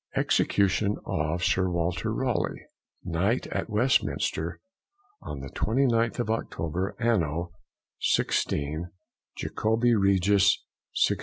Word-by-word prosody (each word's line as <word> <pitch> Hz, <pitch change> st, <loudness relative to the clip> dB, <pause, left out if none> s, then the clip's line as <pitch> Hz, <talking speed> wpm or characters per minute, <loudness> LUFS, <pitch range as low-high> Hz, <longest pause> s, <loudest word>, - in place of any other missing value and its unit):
EXECUTION 100 Hz, +1 st, +2 dB
of 80 Hz, +3 st, -1 dB
Sir 95 Hz, 0 st, +2 dB
WALTER 85 Hz, 0 st, -1 dB
RALEIGH, -, -, -1 dB, 0.4 s
_Knight, 95 Hz, +8 st, 0 dB
at -, -, -2 dB
Westminster, 105 Hz, -, 0 dB, 0.6 s
on 70 Hz, -, -6 dB
the 70 Hz, -, -7 dB
29th 115 Hz, -, +1 dB
of 120 Hz, -3 st, -1 dB
October, 90 Hz, -4 st, -2 dB
Anno 85 Hz, -8 st, 0 dB, 0.5 s
16o, 75 Hz, +3 st, 0 dB, 0.5 s
Jacobi 115 Hz, +2 st, +1 dB
Regis, 100 Hz, -1 st, +4 dB, 0.5 s
1618. -, -, 0 dB
95 Hz, 95 wpm, -27 LUFS, 85-115 Hz, 0.6 s, Regis